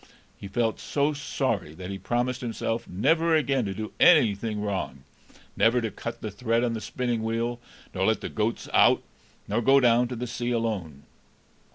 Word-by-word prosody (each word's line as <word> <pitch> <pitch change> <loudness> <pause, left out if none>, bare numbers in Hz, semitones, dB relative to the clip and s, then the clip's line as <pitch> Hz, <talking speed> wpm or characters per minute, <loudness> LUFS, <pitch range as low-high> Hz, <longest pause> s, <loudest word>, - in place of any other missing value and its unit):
He 100 - -9
felt 115 +2 -1
so 145 +1 0
sorry, 130 - -2
that 90 +2 -7
he 95 - -5
promised 120 +5 -1
himself 115 -1 -3
never 160 - +2
again 135 -5 +1
to 100 - -3
do 110 +1 -5
anything 110 - +4
wrong, 95 -10 -3 0.5
never 120 +2 +3
to 115 -3 -3
cut 115 +4 -6
the 110 - -4
thread 115 +3 0
on 120 -1 0
the 110 - -4
spinning 120 -2 -2
wheel, 115 +2 -2 0.3
nor 95 0 0
let 110 -2 +1
the - - -4
goats 110 +1 -2
out, - - +5 0.4
nor - - 0
go 135 +4 +5
down 120 -1 +4
to 125 - -5
the 120 +1 -4
sea 120 0 -3
alone. 105 - -2
115 Hz, 180 wpm, -26 LUFS, 105-125 Hz, 0.5 s, out